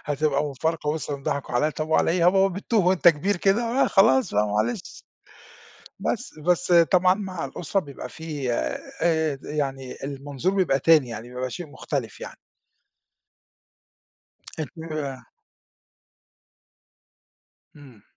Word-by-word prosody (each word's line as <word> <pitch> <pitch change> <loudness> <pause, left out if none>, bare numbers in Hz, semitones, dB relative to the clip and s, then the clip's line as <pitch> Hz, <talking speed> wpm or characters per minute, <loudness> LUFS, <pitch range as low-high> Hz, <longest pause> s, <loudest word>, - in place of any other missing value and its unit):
هتبقى 145 0 0
مفارقة 150 +2 -2
وِصِل 150 -2 -3
إن 140 - -9
ضحكوا 140 -2 -3
عليَّ، 150 +5 +2
طب 155 +1 -4
وعلى 160 - +3
إيه، 175 - +1
ها - - 0
يا 175 - +7
بابا 195 +1 +4
بتُّوه 205 -1 0
وأنت 180 -1 +5
كبير 170 +6 +2
كده؟ 195 +6 +2 0.2
آآ، - - +4
خلاص 130 - +4
بقى 105 +1 +3
معلش. 110 - -2 0.9
بس. 240 +2 -3
بس 175 +3 +1
طبعًا 180 +2 +5
مع 190 -4 -5
الأسرة 185 +4 -2
بيبقى 140 -5 -9
في 145 -6 -4
آآ 160 - -1
د 135 - -14
يعني، 135 -3 -3
المنظور 140 +6 -3
بيبقى 180 -8 +2
تاني 150 -3 +4
يعني، 115 +1 -7
بيبقى 125 0 -3
شيء 175 +5 -6
مُختلف 145 - -5
يعني. - - -8 2.2
أنتِ 155 - -4
ويّاه 145 -6 -5 2.5
امم. 130 -8 -16
155 Hz, 135 wpm, -24 LUFS, 135-175 Hz, 2.5 s, يا